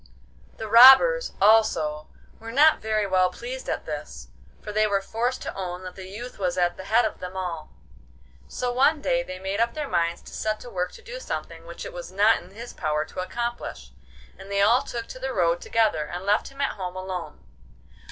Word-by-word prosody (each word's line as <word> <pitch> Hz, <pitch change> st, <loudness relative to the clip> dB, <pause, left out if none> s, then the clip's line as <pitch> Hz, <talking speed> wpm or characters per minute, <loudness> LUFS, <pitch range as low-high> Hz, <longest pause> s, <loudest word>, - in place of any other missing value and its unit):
The 220 Hz, -, -5 dB
robbers, 265 Hz, -, +8 dB
also, 195 Hz, -8 st, +3 dB, 0.3 s
were 225 Hz, 0 st, -8 dB
not 300 Hz, +5 st, +5 dB
very 215 Hz, -1 st, 0 dB
well 185 Hz, -1 st, +3 dB
pleased -, -, -7 dB
at -, -, -3 dB
this, -, -, -7 dB, 0.3 s
for 210 Hz, -, -7 dB
they 215 Hz, +1 st, +2 dB
were 200 Hz, -1 st, +1 dB
forced 235 Hz, +6 st, -2 dB
to -, -, -5 dB
own 180 Hz, -1 st, -5 dB
that 185 Hz, -1 st, -7 dB
the 190 Hz, 0 st, -10 dB
youth 235 Hz, +5 st, -8 dB
was 180 Hz, -3 st, -1 dB
at 175 Hz, -1 st, +1 dB
the 190 Hz, -, -9 dB
head 225 Hz, +3 st, +3 dB
of 215 Hz, -, -4 dB
them 180 Hz, +1 st, -7 dB
all. 170 Hz, -4 st, -4 dB, 0.8 s
So 245 Hz, -, -3 dB
one 280 Hz, +5 st, +3 dB
day 260 Hz, -3 st, +1 dB
they 185 Hz, -7 st, -7 dB
made 190 Hz, +2 st, -3 dB
up 235 Hz, +4 st, +1 dB
their 300 Hz, -2 st, -3 dB
minds 170 Hz, -4 st, -1 dB
to -, -, -13 dB
set 215 Hz, 0 st, -2 dB
to 245 Hz, -, -10 dB
work 180 Hz, -1 st, -2 dB
to 465 Hz, -, -14 dB
do -, -, -7 dB
something 165 Hz, -, -6 dB
which 170 Hz, -, -8 dB
it -, -, -8 dB
was 175 Hz, +1 st, -8 dB
not 205 Hz, +4 st, +3 dB
in 175 Hz, -, -15 dB
his 230 Hz, +5 st, -10 dB
power 155 Hz, -1 st, -1 dB
to 185 Hz, -, -9 dB
accomplish, 235 Hz, +6 st, -5 dB, 0.5 s
and 195 Hz, +1 st, -11 dB
they 200 Hz, 0 st, +2 dB
all 235 Hz, +5 st, +5 dB
took 235 Hz, -1 st, -6 dB
to 255 Hz, -, -8 dB
the 265 Hz, 0 st, -3 dB
road 175 Hz, -2 st, +1 dB
together, 215 Hz, -10 st, +1 dB
and 175 Hz, +4 st, -6 dB
left 205 Hz, +2 st, +2 dB
him 275 Hz, +1 st, -8 dB
at 275 Hz, -, -1 dB
home 185 Hz, -1 st, -5 dB
alone. 185 Hz, -, -6 dB
205 Hz, 210 wpm, -25 LUFS, 180-240 Hz, 0.8 s, robbers